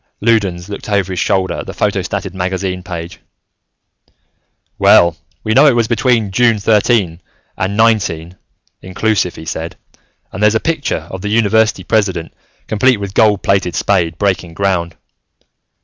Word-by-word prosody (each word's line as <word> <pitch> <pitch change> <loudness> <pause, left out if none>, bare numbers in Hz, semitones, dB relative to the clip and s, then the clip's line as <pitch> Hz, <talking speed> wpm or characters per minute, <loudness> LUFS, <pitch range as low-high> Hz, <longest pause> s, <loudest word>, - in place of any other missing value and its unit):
Loudons 100 -6 0
looked 105 +1 -7
over 100 -2 0
his 90 - -3
shoulder 95 -1 0
at - - -7
the - - -7
photostated 95 - -2
magazine 95 0 -3
page. 85 -2 -7 1.6
"Well, 85 -1 +5 0.3
we 110 - 0
know 140 +5 +6
it 135 - +4
was 115 -2 +1
between 115 -3 +1
June 115 +2 +3
thirteen 105 -4 +1 0.3
and 100 +2 -2
nineteen, 100 -7 +1 0.5
inclusive," 95 0 -1
he 80 - -10
said. 80 +1 -5 0.6
"And 95 - -7
there's 105 +1 +4
a - - +3
picture 145 - -2
of 95 - -6
the 105 - -3
university 110 0 +2
president, 95 -7 -1 0.3
complete 125 +3 +2
with 100 -1 -6
gold 105 -3 +3
plated 95 -3 +1
spade, 85 -5 0
breaking 95 -4 -1
ground. 85 -3 -1
100 Hz, 145 wpm, -15 LUFS, 90-110 Hz, 1.6 s, know